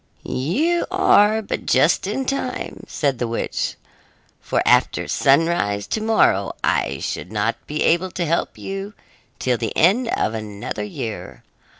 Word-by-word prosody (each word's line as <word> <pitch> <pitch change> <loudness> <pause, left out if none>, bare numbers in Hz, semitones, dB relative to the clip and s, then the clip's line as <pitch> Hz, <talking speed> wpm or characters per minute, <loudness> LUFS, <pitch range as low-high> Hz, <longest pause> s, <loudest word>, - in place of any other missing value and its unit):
"You 295 - 0
are 220 - +4
but - - -4
just 150 +8 +3
in 265 +6 -2
time," 275 +1 -3
said 140 -4 -1
the 120 - -1
witch, 115 - -2 0.6
"for - - -1
after - - +3
sunrise 135 -9 +2
to 220 - -1
morrow 215 - +2
I - - +1
should 90 - -5
not 110 +2 0
be 150 +1 -1
able 175 +3 +2
to 175 - -1
help 165 +1 -1
you 195 +2 -6 0.4
till 125 -2 0
the 115 -3 -3
end 210 +9 +4
of 115 - 0
another 105 -1 -5
year. 105 +1 -6
165 Hz, 140 wpm, -21 LUFS, -, 0.6 s, are